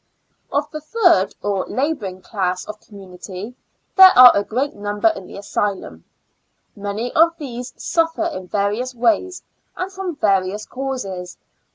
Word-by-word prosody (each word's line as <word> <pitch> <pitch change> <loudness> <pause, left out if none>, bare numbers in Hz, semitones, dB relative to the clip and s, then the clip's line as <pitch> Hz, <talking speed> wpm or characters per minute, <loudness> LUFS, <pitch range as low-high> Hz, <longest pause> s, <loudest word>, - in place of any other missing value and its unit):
Of 285 +1 0
the 305 - -6
third, 335 - +2
or 200 -2 -1
laboring 220 -10 -3
class 185 -4 -2
of 210 0 -8
com 210 - -16
munity, 190 +3 -9 0.4
there 380 -1 +10
are 250 -1 +11
a 200 - +2
great 255 +7 -2
"number 205 +7 0
in 195 - -6
the - - -10
asylum. 200 - -3 0.7
Many 205 +4 -4
of 335 +1 +4
these 250 -4 -7
suffer 330 0 0
in 285 - -5
various 210 +7 -1
ways, 340 +9 0 0.3
and 370 +1 -3
from 375 -3 -4
various 200 -2 0
causes. 225 -10 -5
215 Hz, 145 wpm, -20 LUFS, 195-305 Hz, 0.7 s, are